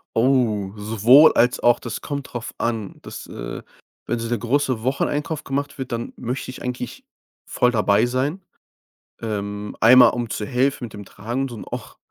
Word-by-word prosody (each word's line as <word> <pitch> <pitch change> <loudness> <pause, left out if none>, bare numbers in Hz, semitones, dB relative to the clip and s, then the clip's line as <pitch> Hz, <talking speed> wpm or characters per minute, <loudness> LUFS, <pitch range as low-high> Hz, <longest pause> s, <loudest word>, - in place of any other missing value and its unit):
Oh, 115 -6 +2
sowohl 115 +8 +6
als 120 +1 +2
auch, 120 0 +4
das 115 -3 -6
kommt 140 -2 -5
drauf 120 -2 -5
an. 110 -4 -3
Das, - - -9
äh - - -7 0.4
wenn 120 - 0
so 115 - -3
der 120 -1 -1
große 130 0 0
Wocheneinkauf 145 +4 -1
gemacht 140 +1 -3
wird, 130 -2 -6
dann 115 0 -4
möchte 125 +2 -4
ich 130 - -11
eigentlich 125 -1 -5 0.4
voll 125 - +2
dabei 105 -1 +3
sein. 135 +9 -1 0.8
Ähm, 105 -2 -4
einmal 125 +3 +8
um 120 -2 -3
zu 105 - -3
helfen 130 +2 0
mit 115 - -11
dem 105 -1 -8
Tragen 120 +8 -4
und 115 -3 -8
auch - - -7
120 Hz, 170 wpm, -22 LUFS, 110-130 Hz, 0.8 s, einmal